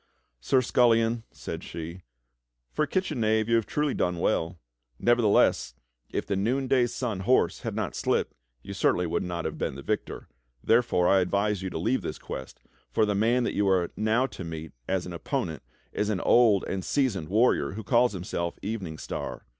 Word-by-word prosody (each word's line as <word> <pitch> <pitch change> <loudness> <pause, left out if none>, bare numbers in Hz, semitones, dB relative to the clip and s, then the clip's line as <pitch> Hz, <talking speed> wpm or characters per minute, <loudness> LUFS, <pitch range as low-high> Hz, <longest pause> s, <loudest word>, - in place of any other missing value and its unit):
"Sir 125 - +2
Scullion," 115 -1 +3
said - - -7
she, 85 +2 -7 0.7
"for - - +1
a - - -15
kitchen 180 -8 -1
knave 110 0 +2
you 115 - +1
have 115 - -1
truly 150 -1 0
done 90 -1 0
well. 85 +1 0 0.4
Nevertheless, 105 - +3 0.3
if - - -3
the 100 - -1
Noonday 125 +5 +2
Sun's 110 -7 -3
horse - - +3
had - - -5
not - - -2
slipped - - 0 0.3
you 100 - -7
certainly 90 -2 +2
would 85 - -1
not 85 -2 -4
have - - -4
been - - -2
the 70 - -8
victor. - - -3 0.4
Therefore 115 -7 +3
I 95 - +5
advise 100 +2 0
you 95 - -3
to - - -5
leave 115 +9 0
this 80 -3 -5
quest, 65 - -8 0.3
for 110 - +2
the 105 - 0
man 115 +5 +2
that - - -1
you 100 0 +1
are 90 -3 +2
now 110 +4 +2
to 100 -7 -7
meet 80 -1 -6 0.2
as 95 -2 -1
an 90 - -6
opponent 85 - -3 0.3
is 105 - -1
an 105 -4 0
old 115 -5 +5
and 95 -1 -3
seasoned 100 - 0
warrior, 105 - +2
who 110 +2 -6
calls 120 +2 +3
himself 85 -2 -3
Evening 95 -7 -4
Star. - - -6
100 Hz, 185 wpm, -27 LUFS, 90-120 Hz, 0.7 s, I